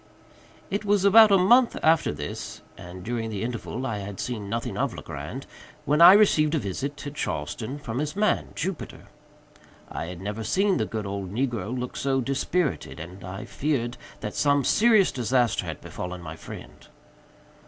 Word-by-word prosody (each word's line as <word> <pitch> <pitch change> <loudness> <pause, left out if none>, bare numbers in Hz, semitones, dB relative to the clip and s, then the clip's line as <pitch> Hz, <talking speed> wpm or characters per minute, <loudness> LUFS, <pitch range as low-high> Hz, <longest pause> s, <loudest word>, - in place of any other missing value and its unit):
It 200 +2 -1
was 205 -1 +2
about 220 +2 +8
a 195 - +7
month 235 +7 +5
after 160 0 +4
this 75 0 -6
(and 90 +1 -10
during 115 +1 -3
the 105 -1 -4
interval 125 +2 -4
I 110 -5 -2
had 100 -1 -7
seen 110 -5 -4
nothing 115 +2 -3
of - - -1
Legrand) - - -7 0.4
when 150 +4 +2
I 175 +2 +11
received 165 -7 +4
a - - +2
visit, 140 +6 -4
at 145 - -5
Charleston, 110 - -4
from 125 -4 -5
his 150 +2 -2
man, 210 -1 +1
Jupiter. 185 +1 -5 0.8
I - - -4
had 90 0 -7
never 105 +3 -4
seen 195 - +2
the - - -1
good 110 -2 -4
old 100 -2 -4
negro 120 0 -2
look 125 0 -5
so 135 -1 0
dispirited, 140 +4 -1
and 90 +4 -9
I 95 +3 -6
feared 130 -5 -2 0.3
that 105 -1 -4
some 145 -1 +2
serious 215 - +4
disaster 125 -1 +1
had - - -6
befallen 90 0 -6
my 80 -1 -7
friend. - - -11
125 Hz, 170 wpm, -26 LUFS, 105-160 Hz, 0.8 s, I